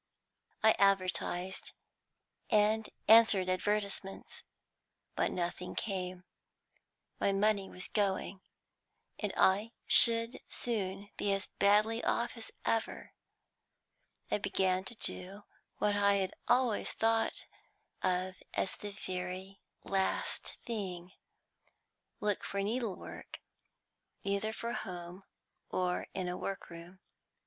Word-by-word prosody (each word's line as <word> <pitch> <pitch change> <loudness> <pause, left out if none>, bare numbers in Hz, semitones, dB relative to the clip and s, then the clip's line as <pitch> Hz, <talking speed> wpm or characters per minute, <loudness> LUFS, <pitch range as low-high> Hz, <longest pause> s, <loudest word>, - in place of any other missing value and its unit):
"I 220 - +8
advertised, 190 -1 +1 0.8
and 215 +1 +3 0.2
answered 220 -4 +7
advertisements, 200 +1 -2 0.7
but - - +2
nothing 180 +1 -3
came. 185 -3 -3 1.0
My 200 - +3
money 200 0 +2
was 180 - -5
going, 195 -2 0 0.8
and 210 -2 -1
I 205 +5 +4
should 230 0 +4
soon 200 -3 -2
be 205 - +1
as 195 +1 0
badly 215 +3 +3
off 235 +1 +1
as 230 -2 -8 0.2
ever. 225 0 -1 1.2
I - - +2
began 190 -1 +1
to 235 - -2
do 195 -1 -1 0.3
what 205 -1 +2
I 200 0 +4
had 190 -2 0
always 245 -3 +2
thought 225 0 +1 0.6
of 185 +1 0
as 190 - 0
the 205 -1 -6
very 185 +1 -4 0.2
last 195 -1 -1
thing, 185 -6 -4 1.1
look 210 -1 0
for 200 - -3
needlework, 220 -2 -4 0.8
either 200 +2 0
for 235 +1 -4
home 180 +1 -6 0.4
or 180 -1 0
in 185 -2 -1
a 180 0 -2
workroom. 180 -1 -6
195 Hz, 105 wpm, -33 LUFS, 185-215 Hz, 1.2 s, I